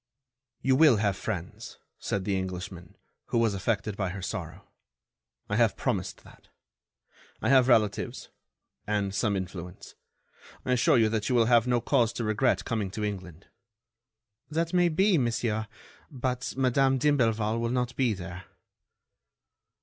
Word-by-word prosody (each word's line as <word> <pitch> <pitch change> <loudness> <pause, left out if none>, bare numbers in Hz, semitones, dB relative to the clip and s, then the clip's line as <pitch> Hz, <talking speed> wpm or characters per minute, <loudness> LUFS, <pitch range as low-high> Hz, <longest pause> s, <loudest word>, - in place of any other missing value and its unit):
"You 130 0 +3
will 145 -5 +6
have 100 -2 +1
friends," - - -6 0.2
said 100 -2 -2
the 100 - 0
Englishman, 90 -1 -6 0.3
who - - -1
was 115 -3 +2
affected 100 +1 -2
by 95 -3 -2
her 95 +1 -6
sorrow. - - -6 0.8
"I 105 - -1
have 115 -4 +3
promised 95 -8 -2
that. - - -18 0.9
I - - -1
have 130 -2 +5
relatives... 105 -5 +1 0.6
and 100 -2 -1
some 100 -1 0
influence. 90 -1 -7 0.7
I - - -1
assure 125 0 +4
you 115 -2 +4
that 110 -1 -1
you 125 - +1
will 115 -2 +4
have 120 0 +4
no 120 -1 +2
cause 120 -5 +2
to 120 - -3
regret 110 +4 +1
coming 110 -4 -2
to 105 +3 -5
England." 95 -4 -5 1.0
"That 165 +2 -1
may 175 -1 +4
be, 190 +2 +3
monsieur, 115 -3 -1 0.4
but 125 -3 -3
Madame 135 +1 +3
d'Imblevalle 115 -6 +1
will 115 0 -1
not 125 0 -1
be 125 -5 +1
there." 90 0 -8
115 Hz, 145 wpm, -28 LUFS, 100-125 Hz, 1.0 s, will